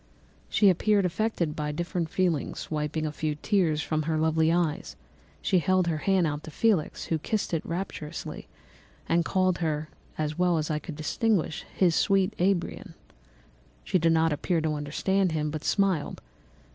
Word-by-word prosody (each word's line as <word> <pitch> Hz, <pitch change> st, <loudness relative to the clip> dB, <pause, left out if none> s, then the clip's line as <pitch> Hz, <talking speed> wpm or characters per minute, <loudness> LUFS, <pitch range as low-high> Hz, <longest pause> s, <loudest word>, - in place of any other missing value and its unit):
She 200 Hz, -3 st, +5 dB
appeared 200 Hz, +2 st, +2 dB
affected 180 Hz, -4 st, -1 dB
by 150 Hz, -1 st, -2 dB
different 170 Hz, +1 st, -2 dB
feelings; 175 Hz, -5 st, -1 dB
wiping 155 Hz, +1 st, -1 dB
a 155 Hz, -, -2 dB
few 155 Hz, 0 st, -2 dB
tears 160 Hz, -2 st, +1 dB
from 155 Hz, -1 st, -1 dB
her 155 Hz, +1 st, -1 dB
lovely 160 Hz, 0 st, +2 dB
eyes, 170 Hz, -3 st, -1 dB, 0.5 s
she 185 Hz, -, +3 dB
held 185 Hz, +1 st, +2 dB
out -, -, +2 dB
her 155 Hz, -, -1 dB
hand 165 Hz, -5 st, +1 dB
to -, -, -8 dB
Felix, 195 Hz, -1 st, 0 dB
who 160 Hz, -, -1 dB
kissed 210 Hz, +3 st, -2 dB
it 165 Hz, -, 0 dB
rapturously 165 Hz, -3 st, -5 dB, 0.6 s
and 170 Hz, +1 st, +2 dB
called 185 Hz, 0 st, +1 dB
her, 155 Hz, -2 st, -1 dB, 0.3 s
as 155 Hz, +1 st, -2 dB
well 180 Hz, -2 st, +3 dB
as 155 Hz, 0 st, -1 dB
I 150 Hz, -, 0 dB
could 150 Hz, +1 st, -8 dB
distinguish, 165 Hz, +2 st, 0 dB
his 180 Hz, -3 st, +3 dB
sweet 195 Hz, 0 st, +2 dB
Arabian. 180 Hz, -1 st, -1 dB, 0.9 s
She 185 Hz, -, +1 dB
did 165 Hz, 0 st, +3 dB
not 160 Hz, -1 st, +3 dB
appear 170 Hz, +3 st, 0 dB
to 155 Hz, -1 st, 0 dB
understand 165 Hz, +5 st, 0 dB
him, 150 Hz, -1 st, -1 dB
but 155 Hz, -1 st, -5 dB
smiled. 195 Hz, -7 st, +1 dB
165 Hz, 165 wpm, -27 LUFS, 155-185 Hz, 0.9 s, She